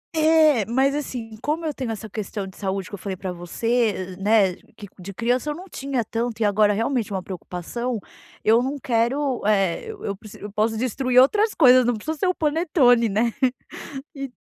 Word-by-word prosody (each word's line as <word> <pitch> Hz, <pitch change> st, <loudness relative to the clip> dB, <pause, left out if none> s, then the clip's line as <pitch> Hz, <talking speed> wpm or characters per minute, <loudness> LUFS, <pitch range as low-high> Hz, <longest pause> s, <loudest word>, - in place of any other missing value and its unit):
É, 310 Hz, -6 st, +5 dB
mas 265 Hz, +4 st, +2 dB
assim, 245 Hz, -6 st, -5 dB
como 320 Hz, +3 st, -2 dB
eu 305 Hz, -, -1 dB
tenho 255 Hz, -4 st, -4 dB
essa 220 Hz, 0 st, -6 dB
questão 210 Hz, -1 st, -5 dB
de 190 Hz, -, -11 dB
saúde 195 Hz, -1 st, -3 dB
que -, -, -16 dB
eu 200 Hz, -, -5 dB
falei 195 Hz, -2 st, -4 dB
pra 185 Hz, -1 st, -4 dB
você, 175 Hz, +6 st, -6 dB
eh 215 Hz, -6 st, +1 dB
eh, -, -, -10 dB
né, 200 Hz, -2 st, +3 dB, 0.2 s
que 205 Hz, -, -9 dB
de 190 Hz, +2 st, -7 dB
criança 245 Hz, +7 st, 0 dB
eu 295 Hz, -, -2 dB
não 365 Hz, +3 st, -9 dB
tinha 270 Hz, -, -3 dB
tanto 230 Hz, 0 st, -3 dB
e 215 Hz, -, +3 dB
agora 205 Hz, 0 st, +4 dB
realmente 225 Hz, 0 st, -1 dB
é -, -, -2 dB
uma 185 Hz, -, -3 dB
preocupação, 200 Hz, +6 st, -4 dB, 0.5 s
eu 225 Hz, +2 st, +5 dB
não 275 Hz, +3 st, -2 dB
quero, 255 Hz, +2 st, 0 dB
eh, 195 Hz, -5 st, +1 dB
eu 430 Hz, -2 st, -8 dB
eu 200 Hz, -, -2 dB
preci 210 Hz, +1 st, -13 dB
eu 205 Hz, -, -8 dB
posso 220 Hz, +2 st, 0 dB
destruir 255 Hz, +1 st, +2 dB
outras 420 Hz, -, +4 dB
coisas, 255 Hz, -4 st, +7 dB
não 240 Hz, -1 st, +1 dB
precisa 310 Hz, +9 st, -4 dB
ser 370 Hz, -, +1 dB
o 365 Hz, -, +1 dB
panetone, 290 Hz, -7 st, +3 dB
né? 225 Hz, +3 st, +1 dB, 0.8 s
E 275 Hz, -1 st, -5 dB
235 Hz, 210 wpm, -23 LUFS, 205-275 Hz, 0.8 s, coisas